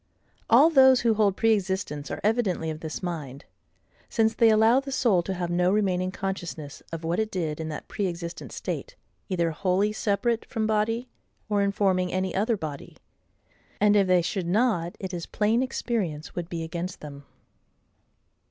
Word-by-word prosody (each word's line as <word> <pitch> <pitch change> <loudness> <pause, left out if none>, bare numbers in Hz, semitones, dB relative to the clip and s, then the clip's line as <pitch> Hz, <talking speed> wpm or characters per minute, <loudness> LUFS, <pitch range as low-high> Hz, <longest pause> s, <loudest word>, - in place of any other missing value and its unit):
All 280 +8 +7
those 265 -3 +6
who 230 -2 +3
hold 205 -3 +2
pre 225 -1 +4
existence 190 -7 -2
are - - -4
evidently 205 -7 +1
of 155 - -7
this 160 +3 -6
mind; 150 -6 -5 0.6
since 225 -1 +2
they 230 - +5
allow 220 +3 +5
the 275 0 -7
soul 230 -9 +3
to 190 +2 -4
have 175 -1 -3
no 180 +1 +2
remaining 185 -3 +1
consciousness 175 -7 -5
of 165 0 -5
what 165 +4 -1
it 220 -1 0
did 165 -6 -3
in 160 0 -4
that 150 - -6
pre 200 -2 -2
existent 170 0 -6
state, - - -5 0.3
either 170 -3 0
wholly 190 +5 +1
separate 215 +2 0
from 220 -1 -3
body, 220 +3 0 0.4
or 205 -1 +2
informing 195 -2 +1
any 185 -1 -1
other 215 +3 +1
body; 150 -5 -7 0.8
and 210 0 +4
if 200 -2 +4
they 180 -1 +4
should 180 0 -2
not, 180 -4 +1
it 190 -1 -5
is 170 -1 -5
plain 220 +3 +1
experience 210 - -3
would 175 -1 -5
be 165 -2 -4
against 170 +2 -5
them. 145 -1 -9
190 Hz, 170 wpm, -26 LUFS, 170-220 Hz, 0.8 s, All